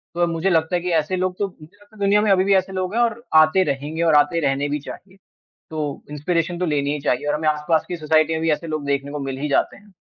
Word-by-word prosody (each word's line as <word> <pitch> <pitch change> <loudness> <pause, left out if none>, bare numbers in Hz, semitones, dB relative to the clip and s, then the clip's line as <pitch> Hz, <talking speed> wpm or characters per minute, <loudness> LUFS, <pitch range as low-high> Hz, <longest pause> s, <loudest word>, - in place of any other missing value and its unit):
तो 175 0 +2
मुझे 170 +3 -1
लगता 165 0 +1
है 175 - 0
कि 180 - -3
ऐसे 155 +5 -2
लोग 185 0 -2
तो 200 - 0
मुझे 165 0 -17
लगता 205 +1 -21
है - - -17
दुनिया 200 +1 +3
में 210 -2 +2
अभी 185 -1 +4
भी 200 - +2
ऐसे 190 0 +1
लोग 185 +1 -3
हैं 240 - +2
और 235 0 0 0.2
आते 155 +5 +3
रहेंगे 145 +2 -3
और 160 -2 +4
आते 150 +3 +3
रहने 140 +1 0
भी 150 - -1
चाहिए। 190 +6 -11 0.5
तो 150 -3 -4
इंस्पिरेशन 170 +3 -1
तो 180 - -1
लेनी 145 -2 0
ही 150 - -3
चाहिए 140 -1 -1
और 150 - +1
हमें 155 0 0
आसपास 150 +1 +1
की 175 - -3
सोसाइटी 155 0 +2
में 160 - -1
भी 165 - +1
ऐसे 160 +3 -3
लोग 155 -2 -4
देखने 140 0 -2
को 150 - -4
मिल 135 -1 -4
ही 150 +2 -3
जाते 140 - +1
हैं। 205 0 -20
160 Hz, 280 wpm, -21 LUFS, 150-185 Hz, 0.5 s, अभी